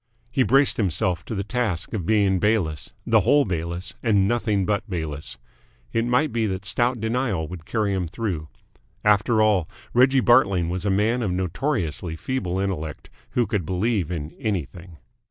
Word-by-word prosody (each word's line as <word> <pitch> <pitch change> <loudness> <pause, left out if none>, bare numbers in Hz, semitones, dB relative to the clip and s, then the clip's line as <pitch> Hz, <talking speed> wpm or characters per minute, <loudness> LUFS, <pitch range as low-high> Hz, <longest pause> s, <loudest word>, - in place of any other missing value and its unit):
He 130 - +1
braced 135 +2 +4
himself 90 -3 0
to 110 - -4
the 100 - -2
task 105 -5 -2
of 95 -7 -3
being 100 -4 +3
Bayliss, 95 -8 0
the - - +4
whole 145 0 +4
Bayliss, 85 0 -3
and 100 -5 +3
nothing 105 -4 +1
but 105 +1 -1
Bayliss. 80 -5 -4 0.6
It 115 0 +1
might 125 +5 +2
be 115 -2 +1
that 95 0 -4
stout 120 +4 +1
denial 110 -7 -1
would 85 -2 -9
carry 105 -3 0
him 95 -3 -1
through. 85 -5 -3 0.6
After 105 +2 +4
all, 100 -6 +2 0.2
Reggie 130 +2 +5
Bartling 100 -9 +4
was 90 +3 -3
a - - +2
man 110 +5 +2
of 110 - 0
notoriously 90 - -2
feeble 95 -1 -3
intellect, 90 -6 -4 0.2
who 120 - +2
could 100 -3 -1
believe 95 +1 0
in 80 -3 -4
anything. 90 - -4
100 Hz, 165 wpm, -24 LUFS, 90-115 Hz, 0.6 s, Reggie